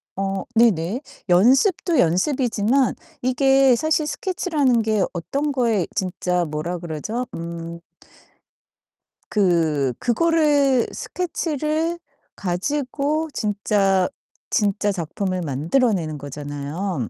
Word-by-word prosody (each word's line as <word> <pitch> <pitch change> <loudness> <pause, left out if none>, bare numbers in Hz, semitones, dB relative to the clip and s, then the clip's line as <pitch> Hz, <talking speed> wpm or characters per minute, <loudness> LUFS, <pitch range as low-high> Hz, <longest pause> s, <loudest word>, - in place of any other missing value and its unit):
어 195 0 -2
네네. 220 - +3 0.3
연습도 270 - +4
연습이지만 240 - +2 0.3
이게 270 0 +4
사실 310 +3 +1
스케치라는 300 -8 0
게 215 -3 +1
어떤 280 - -2
거에 230 -8 +1
진짜 180 -1 -1
뭐라 155 +4 -3
그러죠? 175 +9 -4
음. 170 0 -6 1.5
그 160 - +2
그거를 285 -2 +3
스케치를 325 -1 -2 0.4
가지고 285 - -1
진짜, 200 -2 +1 0.4
진짜 205 0 +1
작품을 185 +1 -3
만들어 165 - +1
내는 155 -5 -3
거잖아요. 145 - -4
210 Hz, 210 characters per minute, -22 LUFS, 175-275 Hz, 1.5 s, 연습도